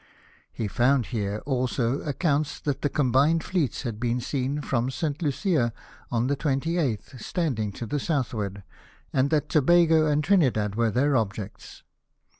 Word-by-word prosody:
He 110 - -3
found 125 +4 +2
here 105 -1 -2
also 130 -1 0
accounts 145 0 -1
that 145 -3 -2
the 145 - +1
combined 145 +4 +2
fleets 165 - -1
had 115 -5 -4
l)een 120 +1 0
seen 135 +3 -2
from 125 -3 0
St. 150 +3 -3
Lucia 145 - +1 0.4
on 120 0 +1
the 140 +2 +1
28th, 135 - -1
standing 125 - -1
to 120 - -6
the 145 +6 -2
southward, 110 - -2 0.5
and 135 +1 +2
that 150 -1 +1
Tobago 160 +1 +4
and 150 0 +2
Trinidad 130 - +2
were 115 +1 +1
their 135 +6 +2
objects. 105 -3 -4
135 Hz, 145 wpm, -26 LUFS, 115-150 Hz, 0.5 s, Tobago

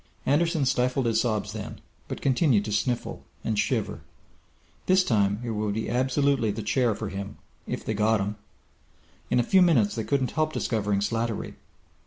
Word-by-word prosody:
Anderson 160 +1 +2
stifled 125 +1 +1
his 115 -1 +2
sobs 110 -4 -1
then, - - -7 0.3
but - - -6
continued 130 - +3
to 105 - -4
sniffle 120 +3 -1 0.2
and 110 -2 -1
shiver. - - -1 0.9
This 185 0 +5
time 100 - +1
it 120 - -3
would 105 -1 -2
absolutely 130 +2 +1
be 100 - -2
The 110 - -4
Chair 110 +1 +1
for 110 -1 -5
him 100 +1 -6 0.3
if - - -4
they 110 - -1
got 110 +1 +2
him! 100 +2 -2 0.9
In - - +3
a - - +3
few 190 +9 +4
minutes 130 - +4
they 110 - -3
couldn't 135 +1 0
help 155 0 0
discovering 105 -7 0
Slattery. 115 +1 -2
115 Hz, 170 wpm, -26 LUFS, 105-135 Hz, 0.9 s, This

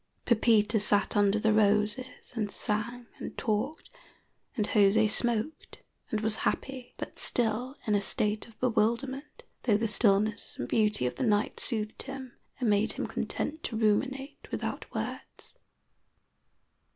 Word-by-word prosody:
Pepita 220 -2 +4
sat 205 0 +2
under 205 0 +4
the 220 0 +2
roses 210 +5 +1
and 215 -4 -1
sang 230 +5 -2
and - - -7
talked, 220 +8 -2 0.7
and 210 -2 +1
José 210 +1 +5
smoked 235 +6 -1 0.3
and 215 - -1
was 220 0 +1
happy, 255 +2 -3
but - - -7
still 245 +3 0
in 215 - +1
a 205 - +3
state 210 +2 0
of 225 - -19
bewilderment, 255 +4 0 0.2
though 215 -4 +4
the 225 +1 0
stillness 210 0 +2
and 120 - -3
beauty 210 - +2
of 125 - -2
the - - -1
night 210 -3 +1
soothed 215 -2 -2
him 265 -2 -7 0.3
and 245 - 0
made 210 +1 +3
him - - -3
content 315 +1 -3
to 225 - -2
ruminate 265 +6 0
without - - -4
words. - - -6
220 Hz, 140 wpm, -29 LUFS, 210-245 Hz, 0.7 s, José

